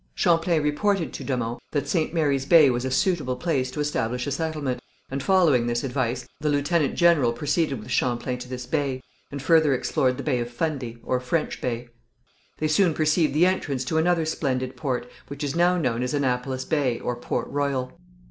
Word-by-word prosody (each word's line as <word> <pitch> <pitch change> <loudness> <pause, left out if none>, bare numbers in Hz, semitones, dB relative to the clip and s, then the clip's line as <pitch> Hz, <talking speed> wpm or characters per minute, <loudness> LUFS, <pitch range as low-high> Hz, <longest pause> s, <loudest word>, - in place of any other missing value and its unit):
Champlain 165 -2 +2
reported 165 +4 0
to - - -6
de 130 -2 -1
Monts 120 0 -3
that 145 -2 -1
St. 155 +1 0
Mary's 145 -5 0
Bay 155 -5 +7
was 120 0 -2
a - - -1
suitable 145 -2 +1
place 130 -2 -1
to 130 - -7
establish 125 -4 -1
a 140 - -3
settlement, 150 -3 -2 0.3
and, 135 +1 -2
following 150 -8 +3
this 120 0 -1
advice, 130 -2 -2
the 150 - 0
lieutenant 145 +1 +1
general 170 -9 +4
proceeded 145 +3 0
with 105 - -9
Champlain 125 0 0
to 125 0 -9
this 125 -1 -5
bay, 135 -1 -2 0.3
and 140 -1 -6
further 155 -3 +4
explored 125 0 0
the 140 - -5
Bay 130 -5 0
of 120 0 -3
Fundy, 125 -3 -3
or 125 - 0
French 150 +6 -2
Bay. 120 -1 -3 0.7
They 155 - 0
soon 160 +1 +3
perceived 155 -2 +2
the 165 +4 +5
entrance 145 -8 0
to 160 +4 +1
another 170 0 +2
splendid 130 -5 -2
port, 130 -4 -2 0.2
which 140 +1 -6
is 145 +1 -2
now 175 +1 +3
known 125 -7 0
as 125 +3 -1
Annapolis 130 -1 -1
Bay, 135 -6 0
or 125 - -2
Port 120 - -3
Royal. 140 -3 -2
140 Hz, 195 wpm, -25 LUFS, 125-160 Hz, 0.7 s, Bay